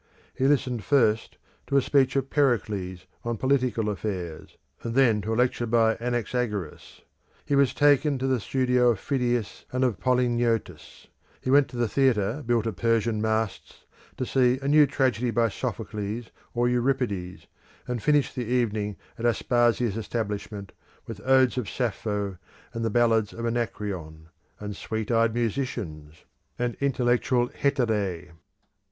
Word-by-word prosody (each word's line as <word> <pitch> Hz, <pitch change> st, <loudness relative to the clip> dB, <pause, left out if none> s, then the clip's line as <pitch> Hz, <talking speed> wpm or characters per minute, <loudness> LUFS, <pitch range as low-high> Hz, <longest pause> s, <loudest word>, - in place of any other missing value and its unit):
He 130 Hz, -, +1 dB
listened 130 Hz, -6 st, +1 dB
first 115 Hz, -5 st, +2 dB, 0.3 s
to 140 Hz, -, +2 dB
a -, -, +5 dB
speech 135 Hz, -1 st, +2 dB
of 135 Hz, -1 st, -1 dB
Pericles 105 Hz, -10 st, 0 dB, 0.2 s
on 120 Hz, -1 st, -2 dB
political 125 Hz, -3 st, +1 dB
affairs, 95 Hz, -6 st, -5 dB, 0.2 s
and 115 Hz, 0 st, -4 dB
then 120 Hz, -6 st, +4 dB
to 110 Hz, -, -4 dB
a -, -, +1 dB
lecture 120 Hz, 0 st, +1 dB
by 115 Hz, -1 st, +3 dB
Anaxagoras. 120 Hz, -6 st, -3 dB, 0.4 s
He 140 Hz, -, +1 dB
was 140 Hz, -2 st, +4 dB
taken 145 Hz, 0 st, +4 dB
to 130 Hz, -, -3 dB
the 130 Hz, -2 st, +1 dB
studio 125 Hz, +1 st, +2 dB
of 115 Hz, -4 st, +1 dB
Phidias 120 Hz, -5 st, -1 dB
and 130 Hz, +1 st, 0 dB
of 125 Hz, -6 st, 0 dB
Polygnotus: 120 Hz, -3 st, 0 dB, 0.3 s
he 130 Hz, -, -2 dB
went 140 Hz, 0 st, +5 dB
to 120 Hz, -2 st, -2 dB
a -, -, +1 dB
theatre 120 Hz, 0 st, +1 dB
built 115 Hz, -2 st, +1 dB
of 110 Hz, -6 st, -3 dB
Persian 115 Hz, 0 st, +1 dB
masts 110 Hz, -1 st, -2 dB, 0.3 s
to 130 Hz, -, -2 dB
see 125 Hz, 0 st, +3 dB
a -, -, -2 dB
new 150 Hz, 0 st, +6 dB
tragedy 125 Hz, -3 st, 0 dB
by 115 Hz, 0 st, +2 dB
Sophocles 105 Hz, +3 st, -4 dB, 0.2 s
or 120 Hz, +1 st, +2 dB
Euripides, 120 Hz, -8 st, -1 dB, 0.4 s
and 125 Hz, -2 st, -3 dB
finished 145 Hz, +2 st, +2 dB
the 125 Hz, -, -3 dB
evening 110 Hz, -4 st, -1 dB, 0.2 s
at 115 Hz, -, -3 dB
Aspasia's 120 Hz, -2 st, +1 dB
establishment, 105 Hz, -2 st, -4 dB, 0.3 s
with 110 Hz, -3 st, -8 dB
odes 130 Hz, -2 st, +4 dB
of 115 Hz, -, -4 dB
Sappho, 105 Hz, -6 st, -2 dB, 0.3 s
and 115 Hz, -1 st, -2 dB
ballads 115 Hz, -2 st, +2 dB
of 115 Hz, -, -5 dB
Anacreon, 95 Hz, -9 st, -4 dB, 0.3 s
and 105 Hz, -1 st, -6 dB
sweet 110 Hz, +2 st, -4 dB
eyed 115 Hz, -1 st, +2 dB
musicians, 105 Hz, -, -3 dB, 0.3 s
and 120 Hz, -1 st, -1 dB
intellectual 125 Hz, -2 st, +1 dB
Heterae. 105 Hz, -, -1 dB
120 Hz, 145 wpm, -26 LUFS, 105-125 Hz, 0.4 s, new